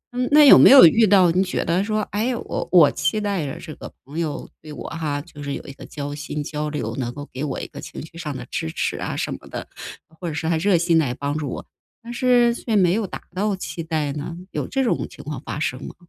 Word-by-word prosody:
嗯， 250 0 -1
那 300 +1 +8
有 275 - +10
没 - - +8
有 265 -7 +10
遇 220 +7 +5
到 185 -3 +5
你 185 +3 +2
觉 185 - -2
得 175 +4 +1
说， 215 0 -1
哎， 235 +4 0
我 - - -5
我 165 -6 +7
期 215 - -1
待 200 -8 -2
着 135 - -6
这 155 - -8
个 - - -10
朋 145 +5 -6
友 160 -3 -3
对 155 -1 -11
我 - - -7
哈， 155 -3 -3
就 150 -2 -13
是 140 -1 -4
有 - - -7
一 135 - -9
个 - - -12
交 145 -1 -6
心、 145 0 -5
交 150 +1 -4
流， 150 0 -4
能 120 -2 -2
够 145 +1 -8
给 130 - -4
我 145 -3 -3
一 - - -5
个 - - -10
情 - - -8
绪 160 - -18
上 150 -5 -5
的 125 - -8
支 80 - -2
持 - - -2
啊 - - -4
什 - - -2
么 - - -10
的， - - -7 0.5
或 175 - -5
者 160 - -3
是 160 - -3
还 165 - +2
热 195 0 +3
心 170 -1 +3
来 125 -5 0
帮 145 +2 -3
助 145 -3 -3
我， - - -6 0.4
但 235 +1 -7
是 240 -1 +3
却 235 -1 -3
没 180 -4 +4
有 215 0 -1
达 - - -8
到 205 +1 0
期 185 -2 -6
待 155 -3 -2
呢？ 155 +4 -6
有 - - -3
这 270 -1 0
种 235 - 0
情 - - -12
况 145 -3 -6
发 150 - -6
生 130 -3 -3
吗？ - - -8
165 Hz, 285 characters per minute, -22 LUFS, 145-205 Hz, 0.5 s, 有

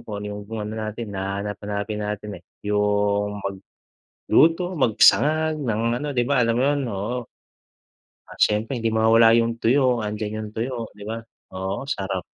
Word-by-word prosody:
kung 105 - -7
ano - - -4
yung 105 0 -6
kung 110 -1 -4
ano 105 - -5
natin 110 0 -5
nahahanap-hanapin 100 +2 -4
natin, 105 0 -4
eh, - - -36 0.2
yung 105 0 +1 0.7
magluto, 175 +3 +2
magsangag 155 +7 +4
ng 115 -5 -1 0.2
ano, 150 - -3
di 120 - +3
ba 135 0 +2
alam 115 -1 +2
mo 125 - +2
yun? 145 0 +2
Oo. 105 +5 -3 1.1
Ah, - - -12
siyempre 110 +5 +1
hindi 115 -1 -1
mawawala 115 +1 +5
yung 115 0 -1
tuyo. 125 0 +2
'Andiyan 105 0 -3
yung 110 -1 -5
tuyo, 115 +4 -3 0.2
di 105 - -19
ba? 110 - -3 0.4
Oo, 95 +8 -4
sarap, 95 -5 -2
110 Hz, 160 wpm, -23 LUFS, 105-120 Hz, 1.1 s, mawawala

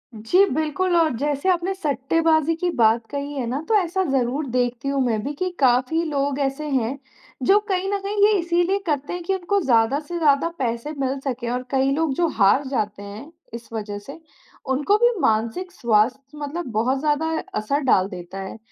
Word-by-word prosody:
जी, 225 - +3
बिल्कुल, 315 +5 0
और 325 -4 +3
जैसे 290 +6 -1
आपने 360 +1 +1
सट्टेबाज़ी 315 0 +1
की 355 +2 -1
बात 225 +1 +4
कही 285 0 -4
है 265 -4 -3
ना, 265 +5 -2
तो 445 - +4
ऐसा 380 -1 +1
ज़रूर 265 +2 0
देखती 245 +1 -1
हूँ 275 -1 0
मैं 225 -3 0
भी 285 - -3
कि 370 +5 -2
काफ़ी 260 +5 +3
लोग 280 -1 -1
ऐसे 275 +2 -2
हैं, 260 -1 0 0.5
जो 390 +11 +5
कहीं 380 0 0
न 400 - 0
कहीं 405 +1 +2
ये 430 - +3
इसीलिए 350 +3 +1
करते 290 0 -1
हैं 355 -1 -5
कि 385 - -1
उनको 380 +2 0
ज़्यादा 240 +1 +3
से 345 +3 -6
ज़्यादा 300 0 +3
पैसे 235 +3 -2
मिल 270 0 -1
सकें 255 -3 -4
और 250 +1 -2
कई 270 0 +2
लोग 315 -2 0
जो 345 +2 +2
हार 205 +7 +4
जाते 210 -6 -2
हैं, 210 +10 -9 0.2
इस 235 0 -8
वजह 210 -2 -4
से, 275 +10 -11 0.5
उनको 285 +10 +2
भी 480 +2 +4
मानसिक 230 +12 0
स्वास्थ्य 260 +2 0
मतलब 300 +4 -4
बहुत 245 +5 +1
ज़्यादा 300 +1 0 0.3
असर 215 +7 0
डाल 185 -4 +4
देता 180 0 -8
है। 190 +3 -7
280 Hz, 190 wpm, -22 LUFS, 240-330 Hz, 0.5 s, जो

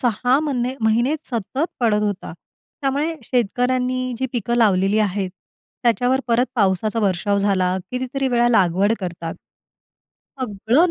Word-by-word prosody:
6 245 +3 +2
म्हणे 260 -4 -1
महिने 235 +6 +2 0.2
सतत 245 +6 -1 0.2
पडत 210 -3 +2
होता. 205 -5 -3 0.5
त्यामुळे 285 +4 0
शेतकऱ्यांनी 250 +2 0
जी 260 - 0
पिकं 235 0 -1
लावलेली 200 -2 +3
आहेत. 195 -2 0 0.5
त्याच्यावर 245 +2 +2
परत 240 +2 +3
पावसाचा 210 +1 +1
वर्षाव 200 0 +1
झाला, 185 -2 +1
कितीतरी 260 +2 -2
वेळा 240 -1 +3
लागवड 195 -1 +3
करतात. 170 -3 -5 1.1
सगळं 245 - +2
235 Hz, 120 wpm, -21 LUFS, 200-255 Hz, 1.1 s, लावलेली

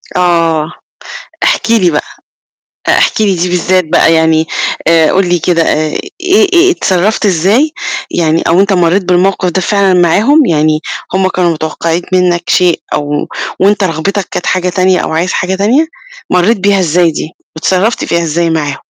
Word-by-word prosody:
آه، 165 -3 +1 0.7
احكِ 230 - 0
لي 185 -7 +3
بقى، 150 - -1 0.8
آآ، - - +3
احكِ - - +1
لي 200 -3 +1
دي 175 +1 -1
بالذات 180 0 +1
بقى 160 +1 +2
يعني 160 0 +2 0.4
آآ، 165 -2 +3
قُل 190 -1 +1
لي 175 -1 +1
كده 170 +1 0
آآ، 155 -1 0 0.3
إيه 380 +2 +3
إيه 360 +2 +4
اتصرّفت 205 - 0
إزاي 205 - +2 0.4
يعني 165 -1 0
أو 170 +2 +3
أنت 200 +1 +2
مرّيت 180 +1 +1
بالموقِف 185 0 +1
ده 185 +2 -2
فعلًا 200 -1 +1
معاهم، 230 - +3
يعني 155 -4 +1 0.3
هم 190 0 +1
كانوا 180 -2 0
متوقّعين 165 +2 -3
منّك 180 -1 +1
شيء 180 -2 +2
أو 145 0 -2 0.3
وأنت 200 +1 +2
رغبتك 185 +3 -2
كانت - - -4
حاجة 185 0 0
تانية 185 0 +1
أو - - -3
عايز 175 +3 -1
حاجة 190 +1 -1
تانية، 240 +11 +1 0.4
مرّيت 185 +6 +2
بيها 200 +1 +2
إزاي 170 -1 +2
دي؟ 155 - -5 0.3
واتصرّفت 190 +7 0
فيها 170 - 0
إزاي 165 +1 -1
معاهم؟ 150 -4 -2
180 Hz, 165 wpm, -11 LUFS, 165-195 Hz, 0.8 s, إيه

